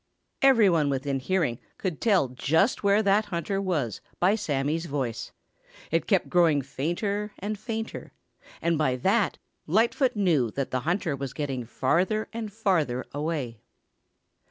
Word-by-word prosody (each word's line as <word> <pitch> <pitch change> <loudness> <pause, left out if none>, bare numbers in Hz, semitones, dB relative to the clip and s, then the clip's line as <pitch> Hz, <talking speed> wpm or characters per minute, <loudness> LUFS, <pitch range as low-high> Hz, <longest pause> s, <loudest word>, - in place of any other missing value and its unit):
Every 260 -6 +6
one 160 -5 +3
within 135 0 -1
hearing 145 -5 0 0.2
could 180 -6 -3
tell 195 - +3
just 160 - +1
where 200 +1 +3
that 205 +2 +3
hunter 195 +1 -2
was 155 - -2 0.2
by 185 +3 +4
Sammy's 160 -4 -1
voice. 135 -6 -3 0.6
It 165 -1 +1
kept 195 -5 +2
growing 165 -6 +3
fainter 200 - -2
and 210 +3 -3
fainter, 225 +1 -5 0.5
and 170 -2 +1
by 130 -5 +2
that 195 - +1 0.3
Lightfoot 230 - +2
knew 165 - +2
that 140 -1 -2
the 130 - 0
hunter 175 -4 0
was 135 -1 -5
getting 135 -5 -3
farther 180 - 0
and 225 -2 -5
farther 175 - 0
away. 145 -6 -3
170 Hz, 140 wpm, -27 LUFS, 140-205 Hz, 0.6 s, Every